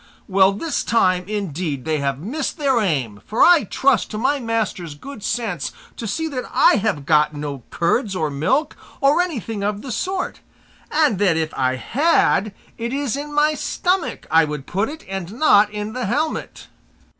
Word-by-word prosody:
Well, 190 0 +4
this 305 +10 -2
time, 185 -5 +2
indeed, 175 -9 -3
they 155 -1 0
have 140 -2 -1
missed 255 - -4
their 275 -5 +2
aim, 130 - -1
for 220 - +2
I 345 -4 +6
trust 265 -6 +2
to 215 - -5
my 270 +5 +1
master's 220 - -2
good 255 - -10
sense 215 -4 -2 0.2
to 230 - -5
see 320 +11 -2
that 255 -4 -4
I - - +5
have 195 -9 -1
got 150 0 +3
no 145 -2 -5
curds 190 +5 0
or 155 -4 -1
milk, 255 - 0 0.2
or 285 +5 +4
anything 230 - -3
of 205 0 -2
the 265 - -6
sort; 370 - -2 0.5
and 300 - +2
that 185 -5 +3
if 160 -1 -2
I 130 -1 +1
had 230 - +2 0.3
it 235 +1 -3
is 275 -3 -1
in 290 +1 -5
my 300 +1 +3
stomach 360 +4 -1
I 165 +1 +6
would 150 -3 -4
put 200 +6 -1
it 315 +2 -9
and 190 -1 -5
not 215 -6 +5
in 210 +1 -5
the 250 -3 -3
helmet." 300 +9 -2
210 Hz, 180 wpm, -21 LUFS, 165-275 Hz, 0.5 s, I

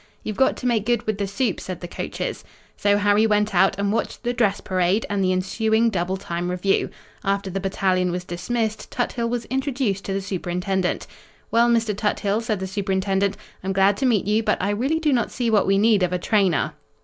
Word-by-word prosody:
"You've 215 - -4
got 265 - +2
to - - -7
make 230 -3 +1
good 240 -2 +1
with 215 -2 -2
the 200 - -1
Supe," 210 +1 -1
said 185 -2 -6
the 175 - -7
coaches. - - -4 0.3
So 205 0 +2
Harry 205 +2 +3
went 210 -1 +1
out 190 +1 +4
and 200 0 0
watched 230 - -2
the 245 0 0
dress 210 -5 +1
parade 185 +3 +1
and 200 -1 +1
the 185 - +2
ensuing 220 +5 +1
double 185 0 -1
time 175 -1 -4
review. 180 +2 +1 0.3
After 195 -1 -1
the 195 - -2
battalion 190 -1 +1
was 180 +1 -3
dismissed, 220 +5 -3
Tuthill 235 -1 -2
was 240 -1 -2
introduced 260 -6 -1
to 195 - -2
the 195 - 0
Superintendent. 185 0 -2 0.5
"Well, 235 +1 +4
Mr. 225 -3 +2
Tuthill," 210 0 0
said 220 -4 -2
the 190 - -3
Superintendent, 195 0 0 0.3
"I'm 190 +1 -1
glad 195 +1 +4
to 265 - +1
meet 220 -6 +2
you, 210 +2 +2
but - - +1
I 200 +2 0
really 260 +10 0
do 305 -3 +2
not 240 -2 +1
see 240 -2 -1
what 210 -3 +3
we 195 0 +3
need 210 -1 +4
of 180 -1 +1
a - - +2
trainer." 185 - +1
200 Hz, 210 wpm, -23 LUFS, 190-225 Hz, 0.5 s, out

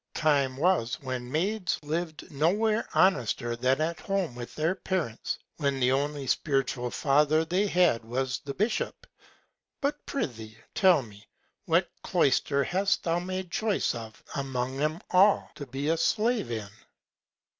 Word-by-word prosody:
Time 140 -4 +2
was 155 -7 +1
when 130 -1 -4
Maids 190 +5 0
liv'd 160 +3 -4
no 150 +3 +2
where 215 +3 +1
honester 125 - +2
than 130 +4 +1
at 160 +1 -1
home 195 -8 -1
with 120 0 -8
their 160 +4 +1
Parents, 180 - -3 0.2
when 140 -3 0
the 125 0 +3
only 140 +1 -1
spiritual 135 -3 0
Father 150 +4 +3
they 185 +5 +1
had 175 - +3
was 125 +2 -2
the 140 -1 -7
Bishop. 215 +4 -1 0.7
But, 290 +1 -2
prithee, 115 - -4 0.2
tell 185 -8 +5
me, 105 -2 -15 0.4
what - - +3
Cloyster 140 0 +2
hast 190 +6 +1
thou 170 0 +1
made 185 0 -4
Choice 215 +1 0
of 110 -2 -9
among 130 -1 -2
'em 155 +3 0
all, 195 +3 +4
to 145 - -8
be 135 +3 -3
a 165 - +2
Slave 220 - +1
in? 110 -4 -4
150 Hz, 145 wpm, -28 LUFS, 130-185 Hz, 0.7 s, tell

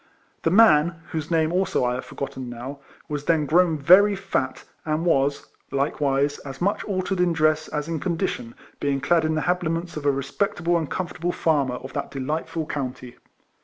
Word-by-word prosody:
The - - +2
man 170 -5 +5
(whose 160 -1 -3
name, 160 -1 +2
also, 185 -8 +1
I 125 - +1
have 125 - -4
forgotten 130 -2 -6
now,) 125 +4 -7 0.3
was 145 -1 -4
then 160 -3 +2
grown 165 +2 +3
very 190 +8 +6
fat, 195 0 -2 0.2
and 155 +2 -1
was, 140 -4 +2 0.2
likewise, 140 0 0
as 135 -1 -9
much 200 +3 0
altered 185 -1 -2
in 180 -1 +3
dress 155 -1 +2
as 150 0 -3
in 165 -1 -2
condition, 165 -9 -2 0.2
being 140 -1 0
clad 165 +3 +2
in 155 0 +1
the 155 - 0
habiliments 175 -1 -1
of 145 -1 -3
a - - +6
respectable 170 +5 -1
and 160 -3 -1
com 185 - -2
fortable 175 +2 -3
farmer 140 -6 +1
of 130 +1 -8
that - - -3
delightful 155 +4 -3
county. 130 -4 -5
155 Hz, 180 wpm, -24 LUFS, 140-175 Hz, 0.3 s, very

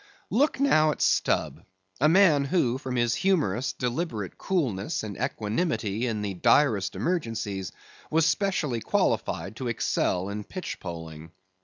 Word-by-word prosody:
Look 275 +5 +2
now 155 - +4
at 150 - -2
Stubb; - - +1 0.4
a 150 +4 +4
man 165 -6 +5
who 135 -6 +1
from 130 -2 -4
his 120 -1 +2
humorous, 145 - +1
deliberate 125 - -3
coolness 145 - -1
and 105 -3 -5
equanimity 110 - -1
in 110 -3 -2
the 100 -1 -2
direst 105 +1 +3
emergencies, 110 - -2 0.4
was 160 0 +3
specially 165 - 0
qualified 95 0 -1
to 130 - -4
excel 95 -5 0
in 105 +1 -4
pitchpoling. 80 - -7
120 Hz, 130 wpm, -27 LUFS, 105-160 Hz, 0.4 s, man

